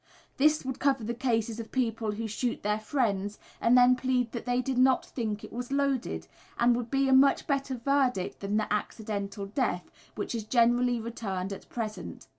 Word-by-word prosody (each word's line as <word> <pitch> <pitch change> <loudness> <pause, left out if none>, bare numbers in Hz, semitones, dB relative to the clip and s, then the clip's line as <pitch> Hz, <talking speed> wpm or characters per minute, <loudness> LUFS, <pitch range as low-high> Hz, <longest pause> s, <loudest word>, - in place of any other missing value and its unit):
This 300 +1 +3
would 265 -1 -4
cover 270 -4 +2
the 235 +2 -2
cases 230 -2 -1
of 225 - -7
people 225 -4 -1
who 225 +2 -4
shoot 235 +3 -2
their 210 +1 +1
friends 210 -4 -1 0.2
and 240 +2 +5
then 250 0 +7
plead 250 -2 0
that 235 0 -6
they 245 0 +2
"did 255 0 -1
not 260 0 +4
think 215 -4 -4
it - - -10
was 245 +2 -5
loaded," 265 - 0 0.3
and 240 0 +4
would 240 -1 -3
be 270 +1 +2
a 265 - +4
much 275 +1 +5
better 275 -2 -1
verdict 250 -6 0
than 200 +1 -1
the 215 -1 0
"accidental 205 -2 -3
death" 195 -4 -2 0.2
which 210 - -3
is 230 -2 -2
generally 240 +2 +3
returned 200 -4 -4
at 195 - -11
present. 220 -3 -5
235 Hz, 190 wpm, -29 LUFS, 215-260 Hz, 0.3 s, then